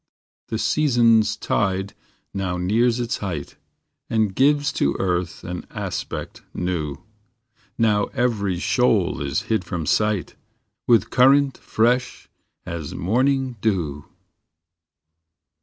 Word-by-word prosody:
The 110 - -2
season 120 -4 +4
s 105 0 0
tide 95 -1 -1 0.4
now 95 -2 -2
nears 115 +7 +2
its 120 -1 -1
height, 85 -8 -5 0.5
And 110 -3 +1
gives 145 +4 +2
to 70 - +1
earth 90 -2 -2
an 90 0 -6
aspect - - -5
new; 80 -6 -3 0.7
Now 105 -3 +3
every 105 -7 -1
shoal 110 - +1
is 70 -1 -1
hid 110 -4 0
from 85 -2 -4
sight, 105 +2 +1 0.5
With 115 -2 +4
current 135 +1 +5
fresh 120 +3 0 0.4
as 80 -4 -5
morning 130 +5 +1
dew. 80 -10 -1
105 Hz, 110 wpm, -22 LUFS, 90-120 Hz, 0.7 s, current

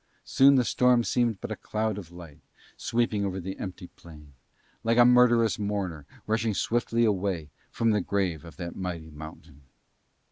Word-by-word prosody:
Soon 140 +1 +5
the 125 -2 +3
storm 125 0 +3
seemed 115 -4 0
but 120 - -6
a - - -2
cloud 110 0 -3
of 85 -4 -11
light 85 -4 -12 0.4
sweeping 115 -3 -1
over 95 -1 -2
the 95 +2 -6
empty 95 -1 -6
plain, 75 -5 -15 0.5
like 115 +1 +1
a 120 - +7
murderous 120 -3 +4
mourner 95 -8 -3 0.2
rushing 110 -1 0
swiftly 115 +1 +1
away 95 -7 -1 0.2
from 115 -1 +1
the 105 -1 +1
grave 90 -5 -1
of 80 -4 -13
that 85 -1 -6
mighty 85 -4 -5
mountain. 75 -1 -12
100 Hz, 165 wpm, -27 LUFS, 85-115 Hz, 0.5 s, a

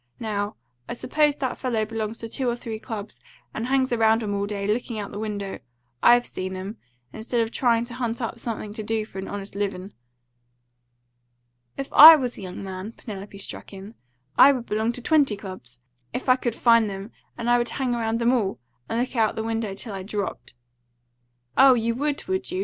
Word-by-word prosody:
Now, 205 -1 -2 0.3
I - - -2
suppose 295 +4 +1
that 260 -3 -3
fellow 230 -4 0
belongs 220 0 -4
to 230 - -5
two 250 +2 -2
or 235 - 0
three 225 -2 -6
clubs, 220 -2 -7 0.3
and 225 +2 -3
hangs 260 -1 +2
around 225 0 +3
'em 205 -1 -2
all 200 0 -1
day, 200 -1 -3
lookin' 225 +2 -1
out 205 -1 -5
the 205 - -6
window, 205 -2 -4 0.4
I've 240 0 +6
seen 185 0 -4
'em, 195 +4 -6 0.4
instead 230 +2 -2
of 225 0 0
tryin' 235 -2 +2
to 240 - -7
hunt 240 -2 -3
up 235 -1 -4
something 215 -3 -4
to 220 - -5
do 220 0 -1
for 195 - -9
an 190 - -5
honest 200 0 -6
livin'." 200 -1 -4 1.8
"If 275 - -5
I 320 +2 +12
was 255 -5 -2
a - - -10
young 185 0 -7
man," 190 +3 -6
Penelope 200 -4 -9
struck 200 - -7
in, 195 +3 -9 0.5
"I 280 - +10
would 250 -3 -4
belong 220 +1 0
to 250 - -5
twenty 280 -9 +3
clubs, 155 - -10 0.3
if 255 - -4
I 255 - +6
could 240 -3 -3
find 230 -3 +4
them 195 +3 -7 0.3
and 235 -1 -4
I 240 0 +4
would 240 0 -1
hang 255 -1 -1
around 225 -1 0
them 235 +2 +2
all, 205 -6 0 0.3
and 225 - -1
look 255 +2 -2
out 220 -2 +2
the 220 - -3
window 225 -3 -2
till 220 +1 -6
I 195 - -5
dropped." 200 - -5 1.0
"Oh, 265 -1 +7
you 230 0 0
would, 285 +4 -2
would 375 0 -2
you?" 365 +2 -3
225 Hz, 205 wpm, -24 LUFS, 205-245 Hz, 1.8 s, I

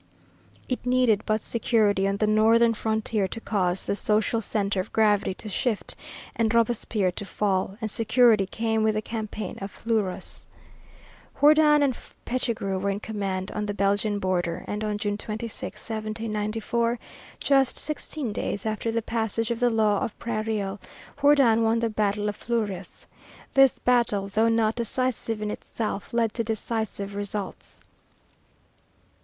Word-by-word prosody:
It 255 - -2
needed 250 -4 +3
but 215 0 +1
security 210 -4 +2
on 200 0 0
the 215 - +2
northern 225 +2 +4
frontier 220 -2 -1
to 225 - -6
cause 190 -4 0
the - - 0
social 215 +2 +1
centre 200 -2 -1
of 185 - -4
gravity 210 -3 +2
to 215 - -10
shift 215 +1 -1 0.4
and 225 -2 +1
Robespierre 230 -4 +1
to 180 - -6
fall, 195 -1 -1
and 220 -3 -3
security 225 -3 +4
came 220 +1 -1
with 215 0 +2
the 215 - 0
campaign 215 -3 -5
of 195 - -4
Fleurus. 215 -4 -3 0.9
Jourdan 300 0 +6
and 265 -3 +2 0.3
Pichegru 230 -6 -1
were 200 +1 -1
in 200 0 -1
command 195 -3 -3
on 210 -1 -3
the 205 - -3
Belgian 205 +1 +1
border, 180 -3 -1
and 210 +1 -3
on 210 -1 -1
June 205 0 -2
26, 220 +1 -5 0.2
1794, 220 +2 -1 0.4
just 270 -2 +3
sixteen 300 -5 -4
days 200 - -3
after 220 +1 -1
the 230 0 -1
passage 225 0 -1
of 235 - -2
the 245 0 +3
Law 215 -3 +2
of 215 - -4
Prairial, 215 -3 -2 0.4
Jourdan 275 -6 +5
won 225 0 +3
the 230 -1 0
battle 210 -1 0
of 205 - -2
Fleurus. 205 -6 -3 0.5
This 270 -1 +5
battle, 235 -5 +2
though 220 +3 +3
not 225 -1 +2
decisive 235 -2 -2
in 210 - -2
itself, 210 -3 -4
led 230 -2 +1
to 230 - -1
decisive 220 -2 -3
results. 205 -1 -5
215 Hz, 150 wpm, -26 LUFS, 205-230 Hz, 0.9 s, Jourdan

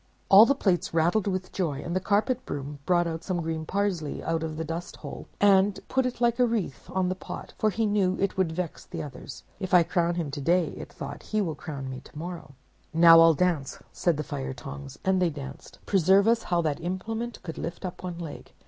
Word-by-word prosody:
"All 205 +4 +9
the 280 - +3
Plates 185 -9 0
rattled 175 +6 +2
with 185 -1 -2
joy, 150 -7 -2
and 170 - -3
the - - +3
Carpet 215 +6 +1
Broom 145 +1 -6
brought 175 -2 +1
some 185 -3 -2
green 160 -1 -3
parsley 190 -7 -1
out 165 0 -1
of 160 -1 -4
the 160 - -2
dust 165 +2 -5
hole, - - -8
and 200 0 +4
put 265 -1 +2
it 245 - -5
like 235 0 +2
a 250 - +5
wreath 215 - -3
on 185 -1 0
the 185 - 0
Pot, 185 - -8
for 215 - +3
he 220 +2 0
knew 200 -3 +2
that - - -2
it 195 - 0
would 185 -4 +1
vex 170 0 -4
the - - -6
others. 135 -3 -9 0.2
'If 185 -1 +1
I 175 - +7
crown 170 0 0
him 165 -5 -2
to 145 0 -5
day,' 175 +4 +2
it - - -9
thought, - - -7
'he 215 - -2
will 170 -5 -1
crown 145 -3 -6
me 130 0 -5
tomorrow.' 165 -3 -8 0.4
"'Now 165 0 +9
I'll 165 -1 +7
dance,' 160 -5 0
said 170 -4 +1
the 150 - -2
Fire 135 -3 -4
Tongs; 140 +1 -9
and 190 -1 +3
they 180 - +3
danced. 140 -3 -9
Preserve 195 +2 +4
us! 230 0 +4
how 175 -1 +2
that 150 -3 -1
implement 220 +7 -4
could 160 - -6
lift 170 +3 -5
up 180 - -6
one 180 -2 -5
leg! 165 -3 -8
175 Hz, 225 wpm, -27 LUFS, 160-195 Hz, 0.4 s, All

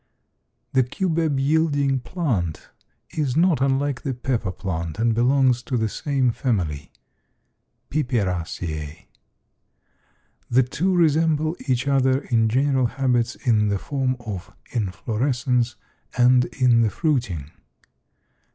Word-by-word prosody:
The 130 - +5
cubeb 160 +1 0
yielding 145 -2 +2
plant 120 - -3 0.4
is 145 -3 -1
not 165 -5 +3
unlike 135 -1 0
the 135 -3 -3
pepper 120 -5 -2
plant 85 -4 -4
and 115 +1 +2
belongs 125 +1 +3
to 125 0 -2
the 110 -1 +1
same 135 0 0
family 90 - -2 1.0
(Piperaceae). 90 - -2 1.4
The 130 +2 +4
two 180 +9 -1
resemble 160 -1 +2
each 130 +1 0
other 135 -1 +2
in 115 -3 +2
general 130 +1 +2
habits 120 -3 0
in 110 -4 +1
the 100 -1 +1
form 130 +3 -2
of 100 -4 -6 0.2
inflorescence 120 +3 -1 0.4
and 125 0 +5
in 125 -3 +3
the 110 - +3
fruiting. 115 - -1
125 Hz, 110 wpm, -23 LUFS, 110-140 Hz, 1.4 s, The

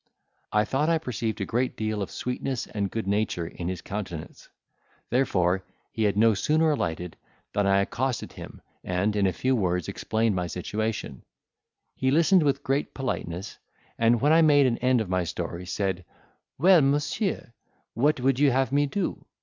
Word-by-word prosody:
I 105 0 +3
thought 145 +7 0
I 165 - +3
perceived 115 -7 -3
a - - 0
great 125 +4 -1
deal 110 -1 -2
of 100 - -3
sweetness 125 0 -3
and 100 -2 -3
good 115 0 -3
nature 100 -4 0
in 85 +1 -6
his 90 -1 -4
countenance; 95 -6 -7 0.6
therefore 95 -7 +2 0.3
he 110 - 0
had 100 -1 +1
no 110 +1 +5
sooner 155 +10 +2
alighted 90 - -3 0.4
than 100 0 +1
I 100 0 +4
accosted 125 +4 -2
him, - - -11 0.2
and, 95 +4 0
in 100 -2 +3
a - - +2
few 130 +9 0
words, 90 -6 0
explained 110 -1 0
my 90 -1 -1
situation: 105 - -3 0.7
he 130 - 0
listened 170 +6 +4
with 140 -2 +1
great 140 +1 -1
politeness, 95 -8 -4 0.4
and, 115 +1 +4
when 145 +5 +3
I 165 - +6
made 145 -3 +5
an 120 -2 +1
end 125 -1 +3
of 110 - -3
my 90 -1 +1
story, 85 +1 -5
said, 95 -1 -2 0.5
"Well, 180 +3 +6
monsieur, 145 - 0 0.4
what 145 +4 +2
would 130 +1 +1
you 145 -1 +5
have 135 +1 +1
me 145 +1 +2
to 170 - -3
do?" 185 - -3
110 Hz, 175 wpm, -26 LUFS, 95-135 Hz, 0.7 s, I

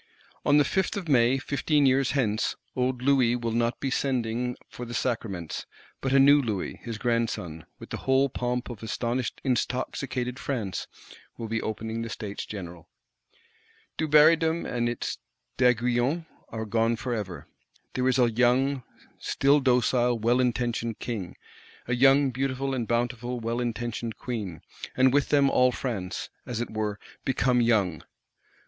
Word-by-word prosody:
On 145 - +4
the 145 - +5
Fifth 190 +7 0
of 185 -4 -5
May, 130 -2 +4
fifteen 145 +2 +1
years 130 0 +3
hence, 110 -6 0 0.2
old 125 0 -1
Louis 130 -3 +4
will 115 -1 -2
not 115 +1 0
be 135 - -2
sending 125 -2 -1
for 125 - -9
the 120 0 -6
Sacraments; 110 -9 -3 0.3
but 135 - -1
a 135 - +5
new 140 +2 +7
Louis, 110 -7 -3
his 115 -2 -5
grandson, 115 -9 -2
with - - -12
the - - -3
whole 135 +1 +2
pomp 125 -1 -3
of 115 - -9
astonished 120 +2 -2
intoxicated 125 0 -2
France, 105 -10 -3 0.5
will 115 - -5
be 115 +1 -1
opening 110 +1 -3
the 115 - -4
States 105 -2 -5
General. 90 -5 -8 1.1
Dubarrydom 160 +2 +4
and 120 -1 -1
its 120 - -4 0.4
D'Aiguillons 125 +5 +2 0.2
are 110 0 -4
gone 115 +2 +1
forever. 110 -7 -4 0.5
There 130 0 0
is 130 - +3
a 120 -2 +4
young, 125 +4 +2 0.4
still 140 +2 +3
docile, 125 -2 +2
well 120 +3 +2
intentioned 120 -2 0
King; 105 -8 -5 0.5
a 120 - 0
young, 135 +2 +5
beautiful 135 +1 -2
and 120 -4 -2
bountiful, 120 +1 -1
well 115 +1 -2
intentioned 120 -1 -3
Queen; 105 -9 -5 0.4
and 130 0 +5
with 145 0 +2
them 140 -2 +4
all 125 0 +4
France, 100 -8 -4 0.2
as 120 -2 -3
it 120 - -3
were, 105 -1 -2 0.3
become 125 -2 +2
young. 105 -8 +2
120 Hz, 150 wpm, -27 LUFS, 115-130 Hz, 1.1 s, new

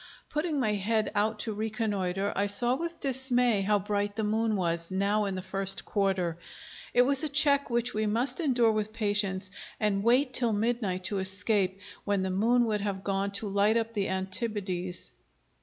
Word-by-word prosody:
Putting 300 -1 -1
my 215 -5 +1
head 215 +2 0
out 215 +1 0
to 220 - -3
reconnoitre, 205 -3 -2
I 200 +1 +1
saw 240 +5 +3
with 335 +4 -4
dismay 250 -5 +2
how 205 +2 +2
bright 205 +1 -2
the 220 - -2
moon 220 +1 0
was, 170 -3 -1
now 200 +3 0
in 195 -1 -3
the 185 - -5
first 195 +1 -2
quarter. 190 -5 -1 0.5
It 245 - +5
was 275 +3 +4
a 310 - +1
check 285 -1 +3
which 240 0 0
we 215 0 -1
must 235 +9 +1
endure 245 -8 +3
with 215 0 -2
patience, 205 -3 -1 0.3
and 200 -2 0
wait 250 +3 +3
till 240 -3 +2
midnight 210 -4 -1
to 195 +1 -2
escape, 190 0 0 0.2
when 200 -2 0
the 190 - -2
moon 235 +6 +2
would 210 -2 -1
have 195 -2 -3
gone 195 0 -1
to 205 +2 -2
light 205 +3 +2
up 230 0 -2
the 200 -3 -1
Antipodes. 190 -2 -2
210 Hz, 180 wpm, -28 LUFS, 195-235 Hz, 0.5 s, It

